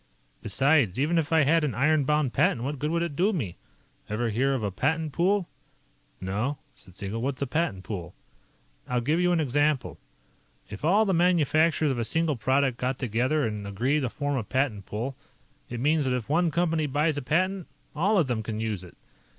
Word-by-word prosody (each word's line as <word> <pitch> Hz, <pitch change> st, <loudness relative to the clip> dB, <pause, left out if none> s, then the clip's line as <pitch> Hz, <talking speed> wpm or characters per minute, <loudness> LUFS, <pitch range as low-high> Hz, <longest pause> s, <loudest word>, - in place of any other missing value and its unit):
"Besides, 130 Hz, -, +2 dB
even 165 Hz, +4 st, +2 dB
if 155 Hz, -1 st, -3 dB
I 160 Hz, -1 st, +5 dB
had 160 Hz, +3 st, +3 dB
an 145 Hz, -, -1 dB
iron 145 Hz, +2 st, +2 dB
bound 150 Hz, -3 st, +1 dB
patent, 120 Hz, -, +2 dB
what 140 Hz, +1 st, -3 dB
good 150 Hz, -, -1 dB
would 170 Hz, +1 st, 0 dB
it 165 Hz, -4 st, -4 dB
do 190 Hz, +8 st, +2 dB
me? 115 Hz, -, -3 dB, 0.5 s
Ever 115 Hz, +2 st, -1 dB
hear 135 Hz, +5 st, +1 dB
of 120 Hz, -, -3 dB
a 100 Hz, -, -1 dB
patent 155 Hz, -, -1 dB
pool?" 190 Hz, +1 st, +1 dB, 0.7 s
"No," 105 Hz, +10 st, -2 dB, 0.2 s
said 90 Hz, -2 st, -16 dB
Siegel. 100 Hz, +4 st, -4 dB
"What's 135 Hz, +1 st, -2 dB
a -, -, 0 dB
patent 130 Hz, -, -1 dB
pool?" 90 Hz, -4 st, -6 dB, 0.7 s
"I'll 125 Hz, -, 0 dB
give 150 Hz, +7 st, +1 dB
you 180 Hz, 0 st, +3 dB
an 175 Hz, -, +2 dB
example. 145 Hz, -1 st, 0 dB, 0.7 s
If 100 Hz, -, -8 dB
all 200 Hz, +8 st, +4 dB
the 195 Hz, -, +1 dB
manufacturers 165 Hz, -3 st, +3 dB
of 125 Hz, -, -2 dB
a -, -, 0 dB
single 160 Hz, +5 st, 0 dB
product 130 Hz, +2 st, +1 dB
get 125 Hz, +1 st, -1 dB
together 130 Hz, +5 st, 0 dB
and 105 Hz, -2 st, -4 dB
agree 125 Hz, +9 st, 0 dB
to 130 Hz, -4 st, -1 dB
form 145 Hz, +2 st, -2 dB
a 120 Hz, -, -1 dB
patent 110 Hz, -4 st, -1 dB
pool, 120 Hz, +6 st, -4 dB, 0.5 s
it 120 Hz, -, -5 dB
means 150 Hz, +3 st, +2 dB
that 130 Hz, -1 st, +1 dB
if 120 Hz, -, -6 dB
one 165 Hz, +4 st, +2 dB
company 165 Hz, -2 st, 0 dB
buys 150 Hz, +3 st, +1 dB
a -, -, -7 dB
patent, 185 Hz, +6 st, 0 dB, 0.3 s
all 200 Hz, +7 st, +2 dB
of 170 Hz, -, +4 dB
them 120 Hz, -4 st, -2 dB
can 110 Hz, 0 st, -4 dB
use 110 Hz, -4 st, -3 dB
it. 90 Hz, -, -14 dB
140 Hz, 200 wpm, -27 LUFS, 115-160 Hz, 0.7 s, I